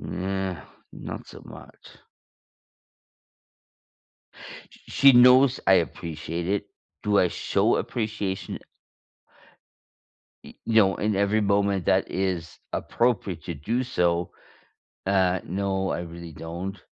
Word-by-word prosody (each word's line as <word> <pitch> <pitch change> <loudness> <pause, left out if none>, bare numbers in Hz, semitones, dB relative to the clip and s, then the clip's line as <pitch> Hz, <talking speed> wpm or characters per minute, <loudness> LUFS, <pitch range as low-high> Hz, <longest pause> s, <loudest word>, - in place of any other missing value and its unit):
Not 95 -4 -6
so - - -12
much. - - -14 2.7
Sh - - -18
she 140 -1 +6
knows 125 +2 +6
I 95 - +6
appreciate 85 0 -2
it. 100 +1 -1 0.4
Do 105 -1 +3
I 90 - +3
show - - +1
appreciation 105 -4 -3 1.9
y - - -12
no, 110 -4 +4
and 105 -1 0
every 100 +2 +2
moment 100 -2 +1
that - - +2
is 90 -4 -3 0.2
appropriate 105 -9 -1
to 85 - -4
do 115 - -2
so, 90 -8 0 0.8
uh, 95 -2 +2
no, 95 +1 -2
I 85 - -2
really 85 -1 -9
don't, 85 +6 -6
95 Hz, 105 wpm, -25 LUFS, 85-105 Hz, 2.7 s, she